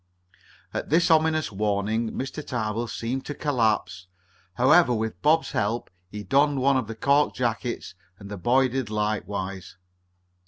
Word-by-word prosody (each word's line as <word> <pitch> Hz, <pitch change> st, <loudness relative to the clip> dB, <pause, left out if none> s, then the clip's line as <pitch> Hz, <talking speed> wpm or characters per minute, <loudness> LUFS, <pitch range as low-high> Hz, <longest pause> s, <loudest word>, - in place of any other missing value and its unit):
At -, -, -4 dB
this 170 Hz, +2 st, +3 dB
ominous 155 Hz, -2 st, +2 dB
warning 105 Hz, +2 st, -1 dB
Mr. 135 Hz, +3 st, -5 dB
Tarbill 115 Hz, -2 st, -3 dB
seemed 120 Hz, +4 st, -4 dB
to 145 Hz, -, -4 dB
collapse. 110 Hz, -, 0 dB, 0.5 s
However, 130 Hz, -, +5 dB
with 110 Hz, 0 st, -3 dB
Bob's 160 Hz, +2 st, +2 dB
help 110 Hz, +3 st, -2 dB, 0.2 s
he 105 Hz, +1 st, -7 dB
donned 140 Hz, +4 st, +2 dB
one 135 Hz, +1 st, +3 dB
of 130 Hz, -4 st, 0 dB
the 115 Hz, -, -6 dB
cork 140 Hz, +5 st, +2 dB
jackets, 120 Hz, -3 st, -3 dB, 0.2 s
and 100 Hz, -, -11 dB
the 100 Hz, 0 st, -6 dB
boy 130 Hz, +8 st, +3 dB
did 130 Hz, -3 st, -3 dB
likewise. 100 Hz, -3 st, -3 dB
120 Hz, 145 wpm, -25 LUFS, 105-140 Hz, 0.5 s, However